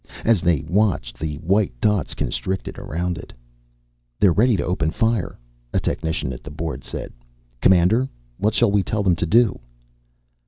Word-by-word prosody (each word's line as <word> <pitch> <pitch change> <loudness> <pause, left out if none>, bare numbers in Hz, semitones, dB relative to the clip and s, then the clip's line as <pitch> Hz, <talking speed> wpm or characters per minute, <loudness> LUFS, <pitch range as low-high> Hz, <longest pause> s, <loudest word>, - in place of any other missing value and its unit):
As 115 -6 +4
they 85 -5 +1
watched, 105 +1 0
the 80 -2 -3
white 95 - +1
dots 105 - +1
constricted 95 0 -3
around 85 +2 -3
it. - - -10 0.9
"They're 95 -4 +5
ready 115 +2 +3
to - - -1
open 90 -4 0
fire," 115 +2 0 0.4
a - - +3
technician 80 -5 -2
at - - -9
the - - -8
board 80 +2 -5
said. - - -6 0.5
"Commander, 95 +8 +4 0.3
what 105 +2 +1
shall 120 -4 +3
we 100 0 +3
tell 105 +2 -1
them 90 -3 +3
to 85 - -1
do?" 115 +3 +3
95 Hz, 160 wpm, -22 LUFS, 85-110 Hz, 0.9 s, They're